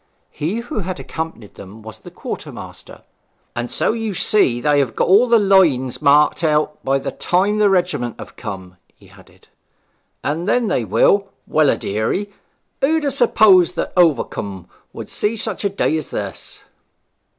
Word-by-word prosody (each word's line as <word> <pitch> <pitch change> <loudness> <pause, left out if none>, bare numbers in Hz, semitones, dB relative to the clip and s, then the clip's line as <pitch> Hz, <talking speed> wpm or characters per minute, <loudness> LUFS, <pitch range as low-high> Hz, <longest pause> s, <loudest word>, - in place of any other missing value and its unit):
He 190 +10 -3
who 235 -2 -5
had 185 -2 -5
accompanied 160 -10 -7
them 105 +3 -12
was 110 0 -10
the - - -12
quartermaster. - - -9 0.5
'And 120 0 -3
so - - 0
you 225 -3 -4
see 150 - +2
they 145 +3 +2
have 135 -5 -1
got - - +1
all 205 +7 +5
the 235 - +6
lines 175 - +2
marked 145 +3 +3
out 150 -1 0
by 135 +1 +1
the 135 - -4
time 200 +4 0
the 210 -1 +4
regiment 175 - 0
have - - -11
come 95 -2 -7
up,' 90 - -29 0.2
he - - -21
added. - - -20 0.8
'And 160 +5 -2
then 240 -2 +1
they 120 - 0
will 200 - +3 0.2
well 155 -2 +2
a - - +1
deary! 110 - -2 0.5
who'd 315 +3 +2
ha' 285 - +1
supposed 210 -9 +4
that - - -3
Overcombe 110 - 0 0.2
would - - -8
see 215 +2 -2
such 220 -2 -3
a 200 - +1
day 195 -5 0
as 155 - -5
this!' - - -6
170 Hz, 170 wpm, -19 LUFS, 130-205 Hz, 0.8 s, the